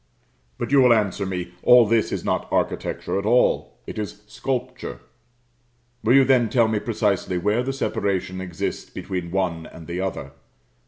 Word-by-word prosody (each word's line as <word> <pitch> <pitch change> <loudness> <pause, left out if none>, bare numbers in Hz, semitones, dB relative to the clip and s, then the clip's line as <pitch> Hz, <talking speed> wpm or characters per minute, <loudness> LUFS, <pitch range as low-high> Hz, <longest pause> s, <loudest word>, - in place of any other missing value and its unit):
But - - -4
you 140 -1 +6
will 125 -2 +6
answer 100 -3 0
me, 90 -2 -4
all 125 -1 +7
this 110 0 +1
is - - -3
not - - -1
architecture - - -1
at 100 - -5
all 120 - +2
it - - -6
is 105 0 -6
sculpture. 125 - -4 1.0
Will 120 +4 +4
you 135 - +7
then 125 -3 +3
tell 115 -2 +3
me 110 -1 0
precisely 105 -5 0
where 105 +6 +1
the 130 +2 -2
separation 95 -8 -2
exists 90 -3 -4
between 90 -2 -5
one 85 -3 -1
and 80 - -12
the 85 +2 -4
other? 90 -7 -4
105 Hz, 165 wpm, -23 LUFS, 90-120 Hz, 1.0 s, all